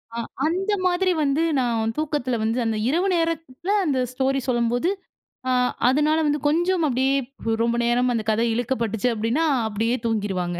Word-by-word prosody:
ஆ - - -4 0.3
அந்த 370 +6 0
மாதிரி 365 +1 +2
வந்து, 285 +3 +1 0.2
நான் 225 -3 0
தூக்கத்தில 295 -5 -1
வந்து 225 +3 0
அந்த 225 -1 0
இரவு 345 +7 +1
நேரத்தில 330 0 -2
அந்த 275 -5 +1
ஸ்டோரி 265 +1 0
சொல்லும்போது, 240 +5 +1 0.6
அ - - +2 0.4
அதனால 300 +4 +2
வந்து 295 0 0
கொஞ்சம் 345 +3 +1
அப்டியே 265 +1 +1 0.5
ரொம்ப 235 0 +1
நேரம் 245 +1 +2
அந்த 225 - 0
கதை 225 +2 +1
இழுக்கப்பட்டுச்சு, 235 -1 -1
அப்டின்னா. 230 +9 0 0.2
அப்டியே 225 +3 0
தூங்கிருவாங்க 190 -6 -2
255 Hz, 145 wpm, -23 LUFS, 230-310 Hz, 0.6 s, மாதிரி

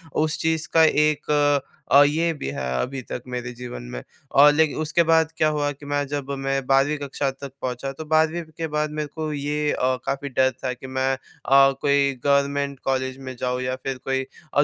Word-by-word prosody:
उस 155 0 +1
चीज़ 160 0 0
का 165 - +6
एक 150 -1 +2 0.6
अ, 140 +2 +8
ये 160 +3 +2
भी 150 - -6
है 70 -1 -5 0.2
अभी 135 +1 -4
तक 125 - -4
मेरे 120 -1 -4
जीवन 120 - -7
में। 60 - -5 0.3
और 145 +1 +8
लेकिन 155 -1 +2
उसके 155 +2 +2
बाद 160 0 +3
क्या 155 - +3
हुआ 145 -1 0
कि 145 +1 -12
मैं 145 0 -1
जब 140 -1 -4
मैं 135 -1 -1
12वीं 135 +2 +3
कक्षा 140 -1 -2
तक 135 0 -9
पहुँचा 130 +2 -3
तो 155 +4 -8
12वीं 160 +2 +2 0.2
के 165 -1 -2
बाद 150 0 -1
मेरे 150 0 -3
को 155 -1 -3
ये 150 +1 -1
अ, - - -2 0.3
काफ़ी 140 +1 -2
डर 130 0 +3
था 130 -1 -1
कि 130 +2 -10
मैं 130 0 0
अ, 135 +1 +3
कोई 140 -1 +3
गवर्नमेंट 140 -1 +1
कॉलेज 130 -1 -1
में 130 -1 -8
जाऊँ 125 0 -1
या 130 0 -1
फ़िर 135 -1 -3
कोई 135 +1 -1 0.3
और 145 - +5
140 Hz, 205 wpm, -23 LUFS, 135-150 Hz, 0.6 s, अ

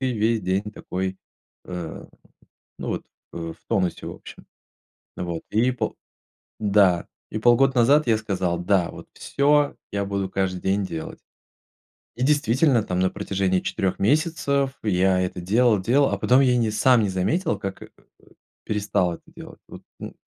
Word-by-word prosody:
ве 130 -2 0
весь 110 +1 +1
день 95 +2 -1
такой, 95 -1 -4 0.5
э, 90 -3 -6 0.7
ну - - -5
вот, - - -3 0.3
э, - - -6
в 85 -1 -5
тонусе, 90 -4 -1
в - - -5
общем. - - -12 0.7
Вот 85 -2 -4
и 115 +4 +2
пол 110 -3 -3 0.6
да. 100 -4 +3 0.2
И 110 - -3
полгода 120 +4 +4
назад 140 +5 +4
я 110 -2 +3
сказал: 95 -5 -2
"Да, 90 0 +1
вот - - -12
всё. 145 +1 +1 0.2
Я 100 0 -1
буду 100 -1 -2
каждый 90 -2 -1
день 100 +1 0
делать". 80 -3 -6 1.0
И 125 - -1
действительно, 145 -3 +3
там 90 -3 -3
на 95 0 +2
протяжении 95 -2 -1
4 95 -1 -2
месяцев 140 +1 +1
я 95 -2 +2
это 90 0 -3
делал-делал. 115 +6 +3
А - - -1
потом 125 +2 +4
я 125 -2 +4
не 115 -2 +1
сам 120 +2 +4
не 105 - +1
заметил, 100 - 0
как 100 -1 -6
э, - - -10 0.3
э, - - -25 0.4
перестал 100 -4 0
это - - -13
делать. - - -12
Вот, - - -11 0.2
ну, - - -7
105 Hz, 160 wpm, -24 LUFS, 95-125 Hz, 1.0 s, полгода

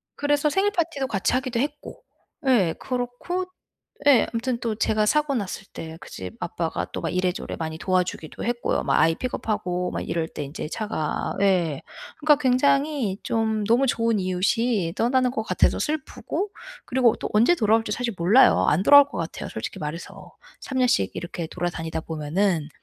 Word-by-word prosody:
그래서 290 +1 +1
생일 390 +5 +2
파티도 330 -7 -1
같이 200 -2 0
하기도 255 -2 -1
했고. 290 +2 -4 0.5
예 200 -11 +3
그렇고 255 +9 -3 0.6
예 275 -5 +6
아무튼 235 +1 -2
또 225 -2 -2
제가 215 -1 +1
사고 300 +2 +2
났을 195 -3 -4
때 160 0 -7
그 - - -12
집 90 -1 -7
아빠가 - - -3
또 - - -4
막 - - -2
이래저래 185 0 -2
많이 160 -1 -4
도와주기도 180 -3 -2
했고요. 240 0 -1
뭐 - - 0
아이 165 0 +4
픽업하고 195 -7 -2
막 - - -4
이럴 165 -1 -1
때 150 - -6
인제 145 +2 -6
차가 205 -7 -2
예. 175 -7 +2 0.4
그러니까 300 0 +5
굉장히 275 -4 +2
좀 220 -1 0
너무 245 +5 +3
좋은 230 -3 +1
이웃이 185 0 0
떠나는 250 +1 +2
것 220 - -2
같아서 - - +1
슬프고 315 +6 -3 0.4
그리고 250 -3 +3
또 - - -5
언제 235 +12 +5
돌아올지 225 -3 +2
사실 235 +1 -2
몰라요. 195 +10 +5
안 170 +6 +3
돌아올 285 +2 +9
것 285 - -8
같아요 165 -1 -5
솔직히 110 - -6
말해서. 155 +3 -7 0.3
3 265 - -5
년씩 240 - +2
이렇게 170 -1 -5
돌아다니다 165 -2 -3
보면은 160 +1 -1
220 Hz, 355 characters per minute, -24 LUFS, 175-260 Hz, 0.6 s, 돌아올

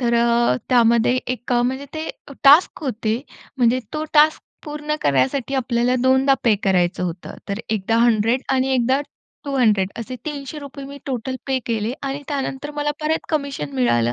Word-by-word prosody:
तर 235 -1 +1
अ, 235 - +3
त्यामध्ये 235 0 +4 0.2
एक 245 +1 -6
म्हणजे 255 +3 0
ते 315 0 -4 0.4
टास्क 295 +6 +6
होते 225 -2 -1 0.4
म्हणजे 245 +1 +3
तो 305 0 -2
टास्क 305 +1 +5 0.2
पूर्ण 300 0 -3
करण्यासाठी 145 - +1
आपल्याला 245 -1 +1
दोनदा 265 +1 +4
पे 230 -3 +5
करायचं 180 -2 +1
होतं. 175 0 -6
तर 200 +2 -3
एकदा 220 +1 0
100 235 +2 +3
आणि 260 0 +1
एकदा 260 +2 +2 0.4
200 220 -9 +2
असे 250 +3 -5
₹300 280 -1 -6
मी 280 0 -9
टोटल 260 0 -3
पे 265 -1 +1
केले 225 0 -1
आणि 275 +1 -4
त्यानंतर 280 0 -3
मला 295 0 0
परत 310 +1 -1
कमिशन 280 - -2
मिळालं 120 -2 +2
255 Hz, 155 wpm, -21 LUFS, 225-280 Hz, 0.4 s, टास्क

